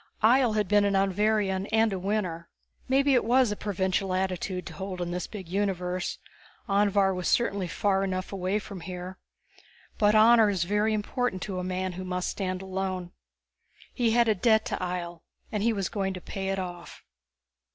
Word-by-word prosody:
Ihjel 240 0 +5
had 210 -2 +1
been 205 +1 +4
an 200 -1 +1
Anvharian 195 0 +1
and 220 -1 +3
a 190 - -2
Winner. 180 -4 -2 0.4
Maybe 275 +1 +3
it 250 - +4
was 245 0 +3
a - - -1
provincial 190 -2 -1
attitude 185 0 -2
to - - -8
hold 190 -1 -6
in 175 -1 -3
this 180 0 -3
big 195 -5 -8
universe 185 -1 -2 0.5
Anvhar 200 -1 +3
was 180 -1 -3
certainly 200 -6 +1
far 195 +1 +1
enough 185 0 -3
away 190 +1 -1
from 200 -3 -7
here 180 +1 -7 0.8
but 210 -1 +4
honor 220 0 +6
is 190 -4 0
very 210 +4 +1
important 215 -1 -2
to 190 -3 -4
a - - -3
man 185 0 -2
who 185 +1 -6
must 180 0 -2
stand 185 -1 -3
alone. 185 -2 -3 0.8
He 240 -3 +1
had 235 +1 +3
a 220 - +4
debt 220 +2 +3
to - - -2
Ihjel, 175 -2 -4 0.3
and 210 - -1
he 230 +2 +3
was 195 -4 -1
going 195 -3 -2
to 185 - -7
pay 195 +2 -5
it 195 - -1
off. 180 -2 -7
195 Hz, 185 wpm, -27 LUFS, 185-210 Hz, 0.8 s, honor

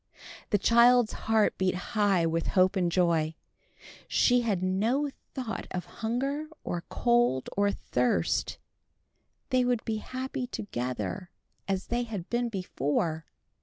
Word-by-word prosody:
The 205 - +3
child's 235 +2 +5 0.2
heart 220 -1 +3
beat 185 -1 +1 0.2
high 200 -5 +3
with 165 0 0
hope 185 +2 +5
and 180 -2 +1
joy. 165 -3 +2 0.7
She 245 -1 +4
had 205 -6 -1
no 230 +10 +1 0.2
thought 250 -4 -4
of 180 -1 -4 0.2
hunger, 275 +7 -1 0.2
or 175 - -3
cold, 240 - +2
or 200 0 +3
thirst. 125 - 0 0.9
They 255 -1 +4
would 245 -2 0
be 220 -1 -1
happy 255 +2 -4
together 175 - -4 0.4
as 195 -1 -1
they 240 +1 0
had 215 -7 -6
been 240 0 0
before. 160 -5 -2
205 Hz, 130 wpm, -29 LUFS, 175-240 Hz, 0.9 s, child's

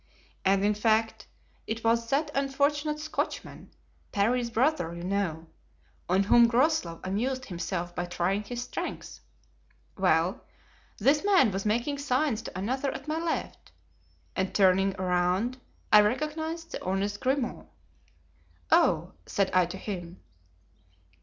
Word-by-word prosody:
And, 195 +1 +3
in 210 - +3
fact, 220 +1 +1 0.4
it 225 +1 -4
was 230 0 +2
that 295 +2 +1
unfortunate 290 +2 0
Scotchman, 310 +1 -4 0.4
Parry's 235 +4 +1
brother, 230 - +1
you 170 - -7
know, 180 -4 -2 0.6
on 190 +2 +3
whom 235 +4 +6
Groslow 240 - +1
amused 255 +7 -2
himself 175 -2 -4
by 175 - -2
trying 180 +3 0
his 240 +3 -5
strength. - - -6 0.8
Well, 185 +3 +1 0.5
this 280 +7 +3
man 375 - +4
was 195 +2 -2
making 240 +7 0
signs 260 -3 0
to 225 - -8
another 260 +8 -1
at 275 - -8
my 310 +1 -1
left, 335 -1 -4 0.6
and 190 0 -2
turning 195 0 +4
around 185 +7 0 0.3
I 210 - +10
recognized 315 +8 -2
the - - -6
honest 195 +2 -1
Grimaud. 260 - -1 1.0
'Oh!' - - +3
said 195 -1 0
I 180 -1 +4
to 185 +2 -7
him. 180 -3 -6
220 Hz, 125 wpm, -28 LUFS, 190-270 Hz, 1.0 s, I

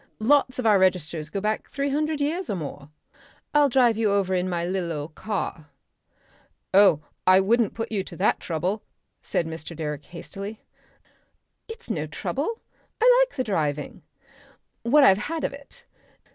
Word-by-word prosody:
Lots 255 +2 +3
of 255 - -3
our 210 -3 +5
registers 170 -4 +1
go 200 - -3
back 215 +2 -2
three 280 0 -2
hundred 305 +1 0
years 335 +6 -1
or 205 - 0
more. 145 -3 -7 0.6
I'll 295 -1 +5
drive 240 -3 +4
you 220 -2 +2
over 195 -2 +1
in 185 0 0
my 170 -1 -1
lil' 180 -1 -2
old 150 0 -5
car." 185 -6 -4 1.1
"Oh! 190 -6 +6 0.2
I 185 0 +7
wouldn't 220 +2 +2
put 225 0 -4
you 200 -3 -1
to 170 - -10
that 195 - +2
trouble," 180 +6 -2 0.4
said 170 - -1
Mr. 160 0 -7
Direck 150 -2 -4
hastily. 195 +4 -8 1.0
"It's 450 0 -7
no - - -2
trouble. 455 0 -3 0.4
I - - +6
like - - -21
the 255 - 0
driving. 150 - -2 0.8
What 285 +5 +5
I - - +8
have 190 - +4
had 325 -1 -3
of - - -1
it. 280 0 -13
200 Hz, 165 wpm, -25 LUFS, 170-265 Hz, 1.1 s, I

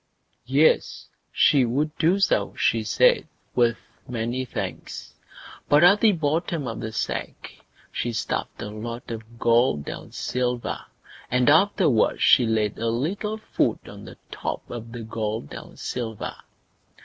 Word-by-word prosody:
Yes! 140 +5 +2 0.2
she 140 -3 +4
would 145 +6 -1
do 175 +5 +3
so, 195 - +1
she - - +1
said, - - +3 0.3
with 120 -2 +3 0.3
many 120 +2 -2
thanks; 100 -6 -6 0.6
but 145 +2 +6
at 200 +4 +6
the 225 - +6
bottom 160 -2 -1
of 115 - -4
the 110 - -4
sack 110 - -4 0.4
she 120 - -2
stuffed 115 - -3
a 105 - -5
lot 115 +3 -7
of 115 +1 -8
gold 115 - +2
and - - -7
silver, 125 0 -2 0.4
and 125 +2 +4
afterwards 160 - +3
she 120 - +6
laid 110 -2 0
a 115 - 0
little 190 - -2
food 220 - -1
on - - -10
the - - -11
top - - -4
of 115 -1 -7
the 120 -1 -7
gold 110 -6 -4
and - - -10
silver. 115 -4 -4
120 Hz, 140 wpm, -24 LUFS, 115-155 Hz, 0.6 s, but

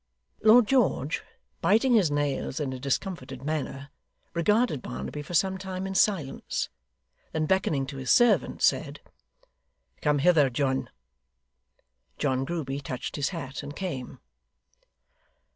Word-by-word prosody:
Lord 220 +2 +7
George, 220 - +1 0.4
biting 230 +5 +4
his 200 -9 +4
nails 145 -1 -1
in 140 -3 -2
a 130 - -6
discomfited 135 -2 -3
manner, 145 -2 -3 0.4
regarded 190 - +2
Barnaby 65 - -5
for 170 +4 -6
some 190 +3 +2
time 190 0 -5
in 190 - -3
silence; 190 -7 0 0.6
then 155 -1 0
beckoning 155 -6 +1
to 135 0 -7
his 130 -1 -5
servant, 240 -1 +4
said: - - +2 1.0
'Come 150 -1 +2
hither, 150 -2 +4
John.' 130 -1 -1 1.3
John 130 -1 0
Grueby 140 -4 -3
touched 130 -2 -5
his 145 - 0
hat, 150 -6 -6
and 145 0 -8
came. 150 -10 -5
150 Hz, 125 wpm, -27 LUFS, 135-190 Hz, 1.3 s, Lord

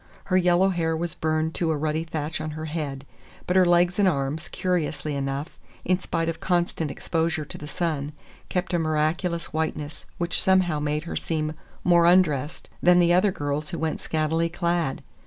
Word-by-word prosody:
Her 185 - -1
yellow 180 +1 +4
hair 165 -3 0
was 170 0 -2
burned 155 0 0
to 170 - -1
a 155 - +1
ruddy 155 +2 -1
thatch 155 -1 -4
on 155 - -3
her 155 - -4
head; 145 -4 -4 0.4
but 180 - -1
her 185 -1 +6
legs 175 +2 +3
and 200 - +5
arms, 150 0 -1
curiously 160 -4 -1
enough, 140 +3 -3 0.3
in 185 +1 +2
spite 165 -3 -2
of 165 -1 -2
constant 175 -3 0
exposure 160 0 -1
to - - -10
the 150 - -8
sun, 150 -3 -2 0.4
kept 180 0 -2
a 175 - +2
miraculous 160 +2 0
whiteness 155 -1 -3
which 175 0 0
somehow 185 -5 +3
made 150 +1 -1
her 170 - -5
seem 155 -1 -2 0.3
more 170 -1 +5
undressed 165 -4 +2
than 175 -1 +5
other 185 +3 +4
girls 145 -2 -3
who 170 - -4
went 160 -1 -2
scantily 160 +1 0
clad. 170 -5 -1
165 Hz, 175 wpm, -25 LUFS, 155-175 Hz, 0.4 s, her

